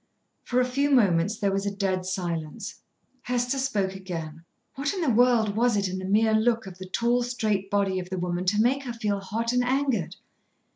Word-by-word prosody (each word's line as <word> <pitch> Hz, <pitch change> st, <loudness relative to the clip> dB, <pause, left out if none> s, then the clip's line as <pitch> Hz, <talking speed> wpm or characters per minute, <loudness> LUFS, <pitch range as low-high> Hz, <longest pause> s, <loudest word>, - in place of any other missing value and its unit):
For 250 Hz, -, 0 dB
a 250 Hz, -, +3 dB
few 275 Hz, +3 st, 0 dB
moments 205 Hz, -6 st, +3 dB
there 200 Hz, -3 st, 0 dB
was 195 Hz, +1 st, -1 dB
a 200 Hz, -, -3 dB
dead 190 Hz, -2 st, -1 dB
silence. 170 Hz, -5 st, -4 dB, 0.4 s
Hester 245 Hz, +2 st, -1 dB
spoke 205 Hz, -8 st, 0 dB
again. 165 Hz, -4 st, -6 dB, 0.3 s
What 280 Hz, +6 st, -2 dB
in 370 Hz, -, -2 dB
the 300 Hz, -6 st, +2 dB
world 230 Hz, -3 st, +3 dB
was 235 Hz, -1 st, +2 dB
it 200 Hz, -1 st, +1 dB
in 185 Hz, +1 st, -4 dB
the 185 Hz, -, -5 dB
mere 220 Hz, +3 st, +3 dB
look 225 Hz, 0 st, +2 dB
of 185 Hz, -1 st, -10 dB
the 185 Hz, -, -7 dB
tall, 235 Hz, +5 st, +1 dB
straight 215 Hz, -5 st, -1 dB
body 195 Hz, -2 st, +1 dB
of 180 Hz, 0 st, -7 dB
the 185 Hz, -, -3 dB
woman 175 Hz, 0 st, -2 dB
to 205 Hz, +3 st, +2 dB
make 255 Hz, +5 st, +3 dB
her 240 Hz, -, -4 dB
feel 210 Hz, -3 st, -1 dB
hot 230 Hz, +5 st, -2 dB
and 250 Hz, 0 st, +2 dB
angered? 255 Hz, -, 0 dB
210 Hz, 205 wpm, -26 LUFS, 185-245 Hz, 0.4 s, a